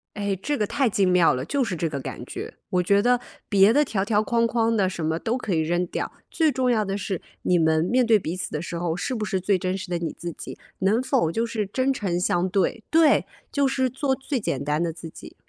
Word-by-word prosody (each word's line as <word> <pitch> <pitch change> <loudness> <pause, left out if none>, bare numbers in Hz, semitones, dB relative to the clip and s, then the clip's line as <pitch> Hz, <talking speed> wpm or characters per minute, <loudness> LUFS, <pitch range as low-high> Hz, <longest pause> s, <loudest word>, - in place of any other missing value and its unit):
哎， 200 -1 -1
这 290 +5 -1
个 210 - +1
太 265 +2 +1
精 195 -2 +2
妙 180 -2 +5
了， 130 +2 -3
就 280 - 0
是 205 -7 -2
这 165 0 -1
个 140 -3 -4
感 - - -7
觉。 - - -7 0.2
我 180 0 +2
觉 200 +3 +3
得 245 +1 +3 0.3
别 200 0 +5
的 295 +4 +4
条 195 -7 -1
条 210 0 +2
框 230 +2 +2
框 230 0 +1
的 190 -3 +2
什 170 -4 -4
么 160 +1 0
都 230 +7 -1
可 220 -7 -3
以 160 - +2
扔 175 +3 0
掉， - - -4 0.2
最 320 -3 +2
重 255 -2 +1
要 220 -2 +2
的 195 -1 -2
是， 190 -3 -3 0.2
你 180 - +3
们 160 0 +3
面 250 +6 +2
对 225 -2 +5
彼 170 -2 -4
此 180 -3 -4
的 150 - -3
时 170 - -6
候， 170 -1 -1
是 255 - -2
不 215 - -3
是 190 -2 -1
最 190 +1 +2
真 185 +1 -2
实 195 -1 -7
的 175 - 0
你 170 - -3
自 175 -1 -6
己， - - -9 0.2
能 210 +6 +2
否 255 - +1
就 230 +6 0
是 220 -3 -2
真 260 +5 0
诚 185 -8 -1
相 180 +1 +1
对 195 +4 0
对， 320 -2 +4 0.3
就 280 -1 +2
是 260 -1 +1
做 265 +2 0
最 270 0 -3
简 140 - -2
单 150 +3 0
的 170 - 0
自 165 0 -9
己。 - - -12
200 Hz, 280 characters per minute, -24 LUFS, 175-240 Hz, 0.3 s, 妙